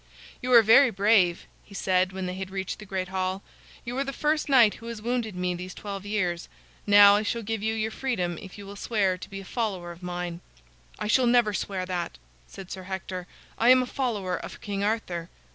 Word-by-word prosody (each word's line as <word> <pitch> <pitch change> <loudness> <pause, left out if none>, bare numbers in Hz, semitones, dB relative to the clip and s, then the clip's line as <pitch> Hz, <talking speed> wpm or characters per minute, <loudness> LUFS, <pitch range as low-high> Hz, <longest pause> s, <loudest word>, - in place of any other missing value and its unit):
"You 255 0 -2
are 230 -2 +9
very 235 +5 +7
brave," 200 -4 +3 0.2
he 200 - -14
said, 185 -1 +1
when 190 0 -4
they 180 - -3
had 190 0 -5
reached 190 -1 -4
the 210 - -10
great 185 -1 -3
hall. 190 0 -2 0.4
"You 240 +1 -4
are - - +2
the 275 - -4
first 300 +2 0
knight 240 -6 +6
who 230 - -9
has 235 -2 -5
wounded 230 -2 -2
me 180 0 -1
these 180 +1 -7
twelve 200 -1 -6
years. 180 -5 -1 0.4
Now 205 0 +8
I - - +1
shall 230 +2 -2
give 225 0 -3
you 220 +1 -1
your 220 0 -1
freedom 185 -11 -2
if 190 -1 -11
you 200 - -9
will 200 +1 -9
swear 200 -3 0
to - - -9
be 195 -1 -7
a - - -12
follower 190 -6 -3
of 170 +1 -12
mine." 175 -1 -5 0.6
"I - - -4
shall 245 +4 +3
never 235 -3 +4
swear 190 -1 -3
that," 180 - -4 0.3
said 190 -2 -11
Sir 190 - -6
Hector; 185 -1 -5 0.3
"I 235 - +4
am 255 0 +7
a - - -3
follower 220 -9 -2
of - - -8
King 200 -1 -3
Arthur." 195 -6 -2
200 Hz, 220 wpm, -26 LUFS, 185-225 Hz, 0.6 s, are